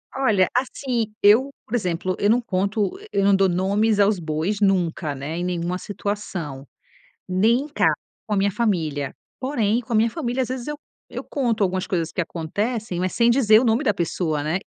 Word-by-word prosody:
Olha, 220 Hz, -9 st, +3 dB
assim, 250 Hz, -3 st, -1 dB
eu, 225 Hz, +7 st, +5 dB, 0.2 s
por 230 Hz, -, -3 dB
exemplo, 185 Hz, -3 st, -1 dB
eu 205 Hz, -, +2 dB
não 240 Hz, +3 st, +4 dB
conto, 200 Hz, -, -1 dB
e -, -, -12 dB
eu 195 Hz, -, +3 dB
não 200 Hz, 0 st, +5 dB
dou 195 Hz, -1 st, +3 dB
nomes 200 Hz, +4 st, +1 dB
aos 200 Hz, -1 st, +3 dB
bois 165 Hz, +6 st, -2 dB
nunca, 175 Hz, -6 st, +1 dB
né, 140 Hz, +4 st, -5 dB
em 175 Hz, -, -2 dB
nenhuma 180 Hz, 0 st, -2 dB
situação, 185 Hz, -9 st, -5 dB, 0.6 s
nem 220 Hz, +7 st, +3 dB
em 300 Hz, -, -7 dB
casa 300 Hz, -, +2 dB, 0.3 s
com 210 Hz, -, -1 dB
a -, -, 0 dB
minha 200 Hz, +1 st, +2 dB
família. 160 Hz, -, -1 dB, 0.3 s
Porém, 240 Hz, -4 st, +1 dB
com 235 Hz, 0 st, -9 dB
a -, -, +4 dB
minha 225 Hz, +1 st, +3 dB
família, 260 Hz, -2 st, -2 dB
às -, -, -3 dB
vezes 255 Hz, -1 st, -4 dB
eu 295 Hz, 0 st, -4 dB, 0.3 s
eu -, -, -6 dB
conto 240 Hz, -6 st, -1 dB
algumas 185 Hz, 0 st, -1 dB
coisas 165 Hz, -3 st, -2 dB
que -, -, -2 dB
acontecem, 180 Hz, +4 st, -3 dB
mas 185 Hz, 0 st, -1 dB
sem 235 Hz, 0 st, +4 dB
dizer 220 Hz, -4 st, +5 dB
o 255 Hz, -, 0 dB
nome 230 Hz, +4 st, +2 dB
da 210 Hz, -8 st, +2 dB
pessoa, 165 Hz, -4 st, -1 dB
né? 160 Hz, +5 st, 0 dB
200 Hz, 200 wpm, -23 LUFS, 175-235 Hz, 0.6 s, eu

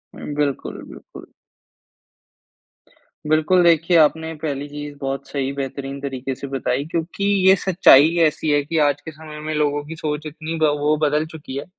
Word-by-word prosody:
हुँ, 145 Hz, -, -7 dB
बिल्कुल, 145 Hz, -2 st, -2 dB
बिल्कुल। -, -, -13 dB, 2.0 s
बिल्कुल 160 Hz, +4 st, +3 dB
देखिए 170 Hz, +1 st, +4 dB
आपने 160 Hz, +1 st, +2 dB
पहली 145 Hz, -2 st, -3 dB
चीज़ 145 Hz, 0 st, -8 dB
बहुत 135 Hz, 0 st, -4 dB
सही 135 Hz, -1 st, -2 dB
बेहतरीन 140 Hz, 0 st, -5 dB
तरीके 135 Hz, -1 st, -4 dB
से 140 Hz, -, -7 dB
बताई। 135 Hz, 0 st, -2 dB
क्योंकि 170 Hz, +4 st, -3 dB, 0.2 s
ये 190 Hz, -, +8 dB
सच्चाई 175 Hz, -6 st, +6 dB
ही 170 Hz, -, -3 dB
ऐसी 155 Hz, -1 st, +1 dB
है 145 Hz, 0 st, +3 dB
कि 160 Hz, +3 st, -3 dB
आज 145 Hz, -1 st, 0 dB
के 160 Hz, -, -8 dB
समय 155 Hz, 0 st, -11 dB
में 155 Hz, +1 st, -4 dB
लोगों 145 Hz, -1 st, 0 dB
की 160 Hz, +2 st, -8 dB
सोच 150 Hz, -1 st, -4 dB
इतनी 155 Hz, +2 st, -6 dB
ब 155 Hz, -, +5 dB
वो 150 Hz, +1 st, +2 dB
बदल 150 Hz, +1 st, +1 dB
चुकी 145 Hz, -4 st, -8 dB
है 140 Hz, -, -5 dB
150 Hz, 175 wpm, -21 LUFS, 140-160 Hz, 2.0 s, ये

